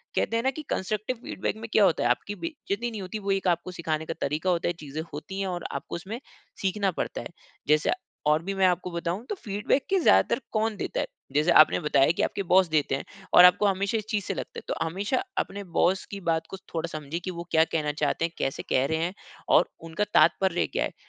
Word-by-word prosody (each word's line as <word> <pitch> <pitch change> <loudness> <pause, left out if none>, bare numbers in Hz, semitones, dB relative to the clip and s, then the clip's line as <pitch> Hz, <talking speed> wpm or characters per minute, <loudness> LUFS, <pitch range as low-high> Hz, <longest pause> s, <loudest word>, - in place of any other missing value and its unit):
कहते 230 - +1
हैं 230 - -1
ना 265 - +2
कि 310 +3 -7
कंस्ट्रक्टिव 215 +5 -2
फीडबैक 190 - -3
में 225 0 -8
क्या 210 - +6
होता 175 - +2
है 120 - +2
आपकी 205 +11 0
बेइज़्ज़ती 240 -8 -4
नहीं 215 -3 -5
होती 190 +3 -5
वो 200 -1 -2
एक 195 -1 0
आपको 175 +1 -1
सिखाने 160 -2 -2
का 165 - -3
तरीक़ा 155 +6 0
होता 170 -1 0
है, 175 - +1
चीज़ें 155 -2 -6
होतीं 190 +6 -6
है 195 - -1
और 175 -2 -3
आपको - - -5
उसमें 200 +7 -6 0.4
सीखना 195 0 +1
पड़ता - - -3
है। - - -6 0.4
जैसे 150 +1 +3 0.4
और 150 +1 +4
भी 195 - -3
मैं 190 - +3
आपको 180 0 0
बताऊँ 170 +5 -3
तो 420 - -1
फीडबैक 210 - -1
के 385 -1 +3
ज़्यादातर - - +4
कौन 220 0 +1
देता - - -3
है, - - -1 0.3
जैसे 150 +4 +3
आपने 155 - +7
बताया 150 -3 +3
कि - - +2
आपके 200 - -1
बॉस 185 0 +6
देते 150 -3 +1
हैं 140 - -5 0.3
और 180 - +10
आपको 180 +3 +5
हमेशा 200 +3 +1
इस 215 - -4
चीज़ 210 -4 0
से - - -2
लगता - - -6
है। - - -14
तो - - 0
हमेशा 200 +9 -1
अपने 200 +1 -2
बॉस 185 +2 +3
की 200 - -5
बात 160 -1 0
को 190 - -6 0.2
थोड़ा 165 0 -1
समझिए 155 +2 -4
कि 185 - -2
वो 170 0 -6
क्या 160 0 +5
कहना 150 -2 +1
चाहते 165 - +1
हैं, 165 - -4
कैसे 135 - -2
कह 130 +1 +3
रहे 160 +1 0
हैं 170 +3 -1 0.4
और - - +5 0.2
उनका 165 +6 -1
तात्पर्य 190 -2 +4
क्या - - -1
है? - - -6
185 Hz, 240 wpm, -27 LUFS, 160-205 Hz, 0.4 s, और